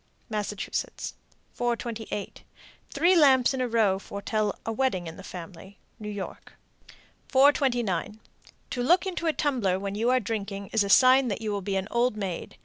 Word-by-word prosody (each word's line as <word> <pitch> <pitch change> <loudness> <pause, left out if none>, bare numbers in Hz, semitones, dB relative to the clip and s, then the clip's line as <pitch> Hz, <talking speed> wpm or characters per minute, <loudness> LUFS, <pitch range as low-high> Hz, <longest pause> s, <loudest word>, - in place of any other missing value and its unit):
Massachusetts. 210 -1 -3 0.4
428. 230 -3 -4 0.5
Three 345 +6 +3
lamps 270 -6 +5
in 260 - -2
a 250 - +1
row 215 -5 +2
foretell 205 +1 -2
a 225 - -1
wedding 225 -7 0
in 165 0 -7
the - - -10
family. 185 +2 -10 0.2
New 210 -1 -6
York. 205 -2 -7 0.7
429. 245 -8 +2 0.5
To 245 - -2
look 350 +10 +3
into 350 -3 -3
a 320 - +2
tumbler 240 -13 0
when 200 0 -4
you 225 +4 0
are 255 0 +4
drinking 200 -3 -4
is 220 -2 +3
a 200 - -4
sign 255 +4 +6
that 205 -2 -2
you 215 -1 -2
will 200 -1 -2
be 195 +1 -3
an 190 0 -1
old 235 -2 +1
maid. 190 -4 -5
220 Hz, 165 wpm, -27 LUFS, 200-255 Hz, 0.7 s, sign